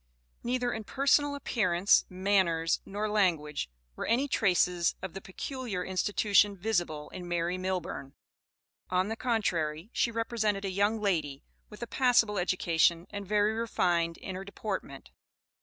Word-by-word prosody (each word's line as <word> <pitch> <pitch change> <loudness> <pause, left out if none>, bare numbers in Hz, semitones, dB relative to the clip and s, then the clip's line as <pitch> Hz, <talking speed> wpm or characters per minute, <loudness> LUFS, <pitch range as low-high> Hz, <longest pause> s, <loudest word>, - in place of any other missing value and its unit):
Neither 245 0 -1
in 220 - -4
personal 285 +4 +2
appearance, 200 -9 +2
manners, 185 -3 +1
nor 205 +2 -2
language, 165 - 0 0.3
were - - -4
any 250 +5 +2
traces 180 -7 +2
of 190 - -6
the 195 - -7
Peculiar 210 -1 -5
Institution 200 +1 +2
visible 175 -7 -1
in 180 -1 -8
Mary 175 0 -1
Millburn. 185 -7 -4 0.8
On 185 +2 +1
the 225 - -2
contrary, 185 -7 -1
she - - +2
represented 220 -3 -1
a 195 - -2
young 205 +4 +1
lady, 155 -9 -1 0.3
with 210 +2 -9
a - - -5
passable 235 -6 +3
education, 170 -1 +2
and 200 -1 -6
very 210 +1 +2
refined 175 -7 0
in 190 - -7
her 185 +1 -5
deportment. 195 -8 -6
195 Hz, 140 wpm, -30 LUFS, 175-220 Hz, 0.8 s, passable